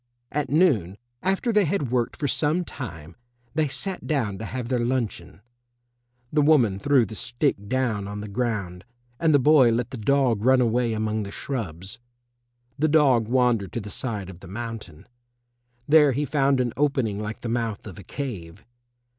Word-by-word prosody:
At 145 -1 -2
noon, 135 - +2 0.2
after 195 +5 0
they 210 -2 +4
had 150 -7 -1
worked 120 -2 0
for 145 - -1
some 155 +6 +1
time, 85 - -8 0.4
they 155 0 +1
sat 185 +7 -3
down 115 -10 -1
to 110 - -5
have 125 +2 -4
their 125 -1 0
luncheon. 120 -7 -3 0.9
The 150 - +4
woman 130 -10 +4
threw 130 +2 +3
the 110 - -9
stick 120 -3 -2
down 120 -6 0
on 105 +1 -6
the 105 - -6
ground, 100 -5 -3 0.4
and 165 -1 +3
the 145 - +6
boy 135 -3 +5
let 120 +2 -1
the 130 - -5
dog 125 -2 +2
run 130 +1 +5
away 120 -1 +1
among 110 0 -1
the 100 - -5
shrubs. 100 - -5 0.8
The 155 - +3
dog 140 -7 +4
wandered 120 -5 +2
to - - -2
the 105 -2 -7
side 100 -5 -3
of 85 - -14
the - - -12
mountain. 110 -6 -7 0.8
There 150 -2 +6
he 145 +4 -1
found 140 -1 +2
an 120 -2 0
opening 130 -8 0
like 105 +1 -5
the - - -4
mouth 115 -3 -2
of 100 -3 -9
a - - -10
cave. 100 -9 -7
120 Hz, 175 wpm, -25 LUFS, 105-140 Hz, 0.9 s, the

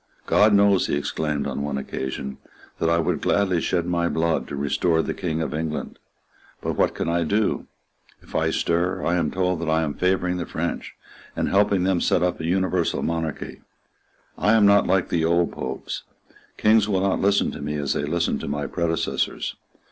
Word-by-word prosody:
"God 105 +1 +4
knows," 100 -2 +4
he - - 0
exclaimed 75 0 -2
on - - -3
one 70 -1 -2
occasion, 65 0 -5 0.4
"that 80 - +1
I 85 - +3
would 85 - 0
gladly 95 -4 +2
shed 85 0 0
my 85 -1 0
blood 80 0 0
to - - -5
restore 80 +4 +1
the - - -2
King 80 -2 -2
of 75 - -4
England. 80 0 -4 0.6
But - - -2
what - - +1
can - - -2
I 85 0 +1
do? 105 +6 0 0.6
If - - -17
I - - +1
stir, 90 +2 0
I 85 - +1
am 90 - +1
told 90 -2 -1
that 85 - -2
I 80 +1 +2
am 75 -2 -2
favouring 90 0 0
the 85 - -4
French, - - -4 0.4
and - - 0
helping 100 -2 +3
them 95 -1 +2
to - - -1
set 90 - +2
up 90 -1 0
an 80 - -3
universal 90 -1 0
monarchy. 80 -2 -3 0.8
I 105 - +3
am 110 -2 +5
not 100 0 +5
like 95 -1 +2
the 85 -2 +1
old 85 +1 +2
Popes. 65 +1 -5 0.6
Kings 110 -1 +4
will 95 -2 +1
not 95 -1 +1
listen 100 +1 +2
to - - -8
me 75 +1 -3
as 70 -2 -1
they 70 - -1
listened 85 +3 0
to - - -6
my 70 0 -2
predecessors. 85 +1 -1
85 Hz, 195 wpm, -24 LUFS, 80-95 Hz, 0.8 s, am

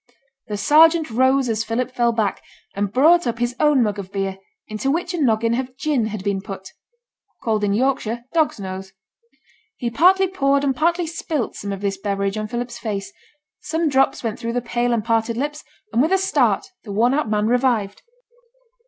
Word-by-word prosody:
The 210 -2 -3
sergeant 315 +5 +5
rose 260 +3 +3
as 225 -1 0
Philip 235 +3 -2
fell 240 -2 +2
back, 220 -3 -1 0.3
and 200 0 -2
brought 320 +6 +4
up 235 0 -1
his 240 +1 -1
own 295 -4 +4
mug 210 -2 -1
of 190 -1 -8
beer, 195 -1 -3 0.3
into 215 +5 -3
which 340 +4 -1
a 345 - -2
noggin 230 -3 +2
of 255 +1 -3
gin 275 -6 0
had 215 -3 -5
been 200 -1 -1
put 195 -1 -8 0.7
(called 215 -2 0
in 205 - +1
Yorkshire 240 -2 0
'dog's 315 -8 +1
nose'). 190 0 -7 0.8
He 240 -1 -3
partly 375 +8 +4
poured 280 -6 +1
and 270 -2 +1
partly 340 +3 +1
spilt 315 -5 -3
some 200 - -5
of 195 -1 -5
this 195 -1 -2
beverage 200 0 -1
on 215 0 -3
Philip's 240 +1 -5
face; 205 -4 -4 0.5
some 320 0 -1
drops 270 -1 +2
went 225 -1 -3
through 230 0 -3
the 245 - +1
pale 240 0 -1
and 225 -3 0
parted 230 0 0
lips, 295 +3 -3 0.3
and 230 - +3
with 315 +5 +1
a 385 - +5
start 385 +1 +1 0.2
the 210 - -8
worn 235 +5 +2
out 280 -6 0
man 210 0 +1
revived. 235 -4 +1
235 Hz, 190 wpm, -21 LUFS, 210-275 Hz, 0.8 s, sergeant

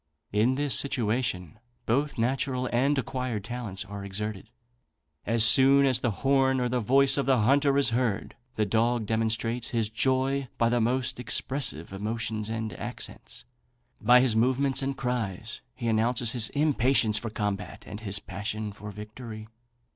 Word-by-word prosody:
In 110 +5 +2
this 145 0 0
situation 115 - 0 0.3
both 140 +5 0
natural 130 +2 -1
and 135 +4 +2
acquired 125 -5 -3
talents 110 -5 -5
are 100 0 -8
exerted. 105 +1 -5 0.8
As 115 0 +4
soon 135 +4 +7
as 130 -2 +3
the 120 - 0 0.2
horn 135 -1 +3
or 125 -1 0
voice 135 +3 +3
of 140 - -1
the 130 -4 +3
hunter 140 +4 +3
is 140 -3 +2
heard, 115 -4 -1 0.2
the 105 - +1
dog 115 +2 +1
demonstrates 115 +2 -1
his 115 -3 0
joy 130 +3 0
by 115 - +2
the 120 0 +1
most 125 +2 0
expressive 125 - -1
emotions 110 +1 -3
and 110 -1 -3
accents. - - -7 0.6
By 125 +3 +6
his 125 -4 +2
movements 130 +4 +2
and 135 0 -3
cries 115 -4 -3
he 120 -2 -4
announces 115 +1 +1
his 120 -2 +2
impatience 130 -7 +2
for 115 - -5
combat, 105 -2 -4
and 105 - -8
his 100 -3 -2
passion 105 +2 -5
for 105 +1 -9
victory. 110 +1 -9
120 Hz, 150 wpm, -27 LUFS, 110-130 Hz, 0.8 s, soon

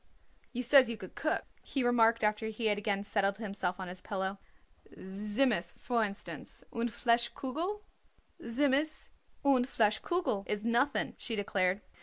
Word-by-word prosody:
"You 250 0 -3
says 265 -1 +7
you 230 - -3
could 185 -3 -10
cook," 315 - -1 0.2
he 270 - -2
remarked 230 -2 +4
after 210 +1 +1
he 220 +1 -4
had 205 -1 +2
again 200 -1 -1
settled 200 -1 0
himself 195 -4 -3
on 185 - -5
his 180 +1 -8
pillow. 195 0 -3 0.6
"Tzimmus, 205 0 +1
for 235 -2 0
instance, 200 -1 -7
und 235 0 -1
Fleisch 235 +2 +2
Kugel?" 330 +10 -3 0.6
"Tzimmus 285 +4 +1 0.3
und 260 -2 +4
Fleisch 215 -4 +2
Kugel 345 - 0
is 210 0 -2
nothing," 240 +5 +1
she 230 - -3
declared. 195 -1 0
225 Hz, 150 wpm, -32 LUFS, 200-250 Hz, 0.6 s, says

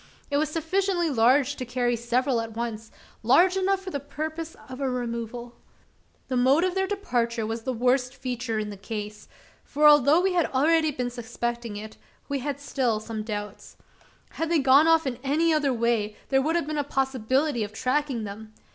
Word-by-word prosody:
It 285 - +2
was 305 +1 +1
sufficiently 345 +1 0
large 260 +4 +3
to 255 - -4
carry 245 0 0
several 240 +1 0
at 225 -1 -7
once 225 -1 -4 0.3
large 340 +11 +4
enough 385 0 +1
for 375 - -6
the 285 - -2
purpose 315 +3 -6
of 255 +2 -8
a 270 - 0
removal. 240 -1 -5 0.7
The 260 - -2
mode 265 +6 +4
of 370 -1 +1
their 385 0 0
departure 240 - -1
was 225 +1 -3
the 260 - -2
worst 250 +2 +1
feature 245 -3 -3
in 210 -1 -3
the 200 - -8
case; 210 +1 -7 0.4
for, 300 +1 +3
although 295 +2 +6
we 375 +1 +1
had 345 -2 +2
been - - -11
already 300 -3 +2
suspecting 235 -2 -4
it, 215 +1 -9 0.3
we 280 -1 -2
had 280 +1 -4
still 255 -6 -1
some 220 0 -5
doubts. 210 -2 -6 0.5
Had 325 0 -3
they 335 - +3
gone 275 +2 +5
off 325 -1 +4
in 255 -3 -3
any 315 +4 +2
other 295 -3 +2
way, 230 -3 0
there 270 -1 +3
would 315 +4 0
have 340 - +1
been 305 0 -3
a - - +1
possibility 265 -1 0
of 205 - -6
tracking 255 +1 -1
them. 215 +1 -8
260 Hz, 190 wpm, -26 LUFS, 235-300 Hz, 0.7 s, although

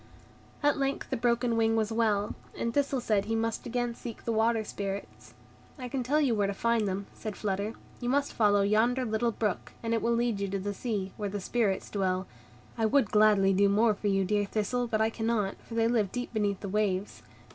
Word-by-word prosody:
At 290 0 +3
length 275 0 -2
the - - +1
broken 235 0 +1
wing 225 0 +2
was 220 -1 0
well, 215 -2 +1 0.2
and 230 - -2
Thistle 280 -1 +1
said 210 -4 +1
he 225 +1 -1
must 225 +1 -2
again 240 0 -1
seek 230 -1 -9
the 230 - 0
Water 225 0 +2
Spirits. 200 -1 -6 0.4
"I 255 -2 -5
can 265 +1 -2
tell 280 +5 +1
you 275 -6 +2
where 205 -2 +1
to 200 - -3
find 230 0 +1
them," 195 +1 -2
said 215 -3 -6
Flutter; 205 +1 -2 0.3
"you 245 - -2
must 280 +2 +1
follow 205 -2 +3
yonder 235 +5 +2
little 230 +1 0
brook, 215 -4 -2
and 230 0 0
it 225 - +1
will 235 0 +2
lead 235 -3 0
you 200 - -1
to 195 +1 -2
the 205 +2 -3
sea, 200 -3 -3
where 205 -2 -2
the 205 +1 -3
Spirits 200 -1 0
dwell. 190 -2 0 0.5
I 220 - +3
would 255 -2 +2
gladly 210 -2 +5
do 200 +1 +4
more 215 +2 +4
for 205 +1 -4
you, 195 -1 +2
dear 205 +1 +1
Thistle, 220 +4 -1
but 220 -1 0
I 220 +1 +2
cannot, 225 -3 -1
for 230 - -9
they 225 0 +3
live 220 -5 +1
deep 245 -1 -4
beneath 205 -3 0
the 200 - -4
waves. 200 -1 -1
220 Hz, 220 wpm, -29 LUFS, 200-235 Hz, 0.5 s, gladly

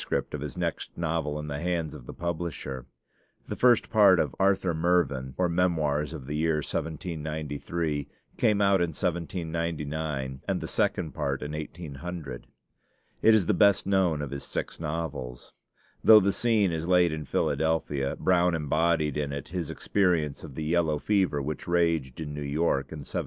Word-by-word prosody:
of 75 - -5
his 75 -4 -6
next - - -2
novel 80 -3 -1
in 75 0 -5
the 70 -1 -4
hands 85 -2 -1
of 70 -6 -11
the - - -7
publisher. 85 -7 -4 0.6
The - - -4
first 120 -3 +4
part 100 -5 +6
of - - 0
'Arthur 95 -2 +2
Mervyn: 80 -6 +1
or 90 - +2
Memoirs 80 -4 +1
of 65 - -7
the 75 - -5
Year 75 -1 +1
1793' 80 -2 -3 0.3
came 105 -3 +2
out 100 -2 +4
in 85 -2 0
1799, 80 -5 -3
and - - 0
the - - -5
second 80 -4 0
part - - -2
in 75 - -5
1800. 75 -2 -6 0.7
It 110 0 +6
is 105 -5 +3
the - - +2
best 100 -1 +4
known 95 -6 +2
of 70 - -5
his 70 -1 -5
six - - -4
novels. 75 -6 -5 0.5
Though 110 -1 +9
the 100 -1 +1
scene 110 -6 +2
is 80 0 -3
laid 90 -2 +4
in 80 -1 -4
Philadelphia, 75 -2 0
Brown 90 -1 +3
embodied 75 -1 +1
in 75 -1 -1
it 70 -1 -5
his 85 -2 -3
experience 85 -8 0
of 75 -5 -9
the 80 - -3
yellow 80 -1 +1
fever 95 -5 +1
which 75 +2 -5
raged 85 -7 +1
in 75 -2 -5
New 75 - -5
York 70 -1 0
in 80 -2 -6
1799. - - -4
80 Hz, 170 wpm, -28 LUFS, 75-90 Hz, 0.7 s, Though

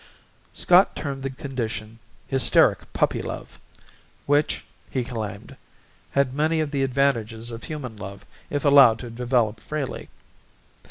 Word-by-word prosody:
Scott 180 +2 +4
termed 140 -2 -4
the 135 - -2
condition 115 -5 -5 0.3
'hysteric 135 -1 +3
puppy - - +1
love' - - -7 0.7
which, 145 +1 +1 0.2
he 130 - -1
claimed, 110 -4 -6 0.6
had 140 -2 +2
many 155 +3 +1
of 155 -2 -1
the 140 -2 -1
advantages 120 -4 0
of 115 0 -8
human 140 -7 -6
love 100 0 -9 0.2
if 145 0 -2
allowed 140 -6 +7
to 120 +1 -8
develop 120 -2 0
freely. 150 0 -5
130 Hz, 125 wpm, -24 LUFS, 115-140 Hz, 0.7 s, allowed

